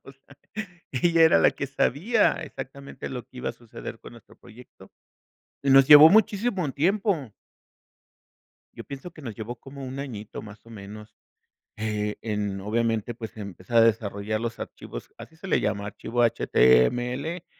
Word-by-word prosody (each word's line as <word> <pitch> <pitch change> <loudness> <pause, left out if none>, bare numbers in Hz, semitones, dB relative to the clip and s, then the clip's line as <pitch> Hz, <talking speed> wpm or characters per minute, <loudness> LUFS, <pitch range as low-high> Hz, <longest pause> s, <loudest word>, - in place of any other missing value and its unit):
o - - -13
sea, - - -22 0.5
ella 165 +5 +3
era 160 - +6
la - - +5
que 145 - -5
sabía 170 - +2
exactamente 135 +1 -8
lo 125 -2 -5
que 130 - -20
iba - - -2
a - - -11
suceder 115 -1 -10
con - - -12
nuestro 115 - -17
proyecto 120 +1 -16 0.7
y 140 - +1
nos 135 0 +7
llevó 150 +1 +11
muchísimo 200 - +2
tiempo. 175 - 0 1.4
Yo - - -9
pienso 140 +5 -8
que 155 -2 -14
nos 120 -5 -6
llevó 115 +3 -6
como 135 +3 -10
1 130 +1 -6
añito, 110 -7 -7
más 105 0 -13
o - - -14
menos, 105 0 -11 0.6
eh, 105 -1 -2
en 105 -3 -3
obviamente 115 +1 -1
pues 110 -1 -9
empezar 100 +2 -4
a 115 - +8
desarrollar 110 -1 0
los 115 -1 -4
archivos, - - -8
así 160 - -12
se 175 +4 -10
le - - +2
llama 100 -1 -1
archivo 115 +3 -3
HTML 120 - +2
120 Hz, 160 wpm, -25 LUFS, 110-145 Hz, 1.4 s, llevó